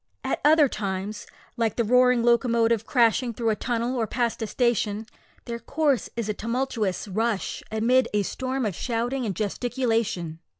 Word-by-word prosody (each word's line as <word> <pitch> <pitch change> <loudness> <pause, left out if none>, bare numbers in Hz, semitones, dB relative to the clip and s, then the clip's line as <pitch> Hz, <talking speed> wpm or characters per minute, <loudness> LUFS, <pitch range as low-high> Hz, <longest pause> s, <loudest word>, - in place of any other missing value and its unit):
At - - -2
other 300 0 +6
times, 200 -2 -4 0.3
like 230 -2 0
the 235 - +1
roaring 250 +1 +4
locomotive 235 -2 +2
crashing 235 -1 +2
through 230 -1 0
a - - 0
tunnel 240 +2 -2
or 230 -3 0
past 235 +1 -1
a 220 - -1
station, 220 -3 0 0.4
their 235 -1 -5
course 280 +2 0
is 230 -3 -2
a 210 - 0
tumultuous 230 -3 -2
rush, 215 +1 -1
amid 235 +3 +3
a 210 -1 +1
storm 260 +5 -2
of 205 - -1
shouting 240 +5 -2
and 195 - -3
gesticulation. 220 -6 -1
230 Hz, 160 wpm, -25 LUFS, 215-250 Hz, 0.4 s, other